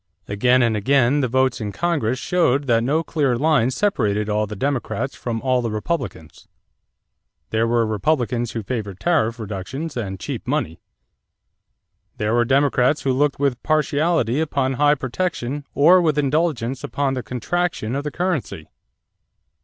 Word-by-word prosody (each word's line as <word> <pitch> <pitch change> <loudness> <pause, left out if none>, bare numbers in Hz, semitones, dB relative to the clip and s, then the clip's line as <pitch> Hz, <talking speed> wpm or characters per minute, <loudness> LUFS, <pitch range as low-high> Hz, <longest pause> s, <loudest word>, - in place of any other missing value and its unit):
Again 125 +5 +3
and 115 -2 +2
again 135 +5 +2
the 130 - +1
votes 130 0 +1
in 105 -1 -3
Congress 135 - -1
showed 145 -3 +1
that 115 -3 +3
no 150 +6 +1
clear 140 -7 0
line 140 -3 +3
separated 110 - 0
all 105 0 0
the 105 - -6
Democrats 135 +3 -2
from 115 -2 -4
all 130 -1 +2
the 115 - -2
Republicans. 110 - -4 1.0
There 110 +1 +1
were 115 0 +2
Republicans 120 +2 -1
who 115 - -4
favored 105 -4 -4
tariff 120 -9 +1
reductions 110 - -5
and 95 -6 -4
"cheap - - -6
money." 80 +1 -2 1.4
There 105 +1 0
were 120 0 +3
Democrats 135 +1 +2
who 135 - +1
looked 145 +2 +1
with 140 -3 0
partiality 155 -3 +1
upon 140 -4 0
high 145 +2 +3
protection 140 0 -3
or 175 +6 +6
with 155 -3 +1
indulgence 140 -4 0
upon 140 -2 -1
the 130 - -2
contraction 125 -1 -2
of 140 - -2
the 150 - -2
currency. 175 - -3
130 Hz, 150 wpm, -21 LUFS, 115-150 Hz, 1.4 s, or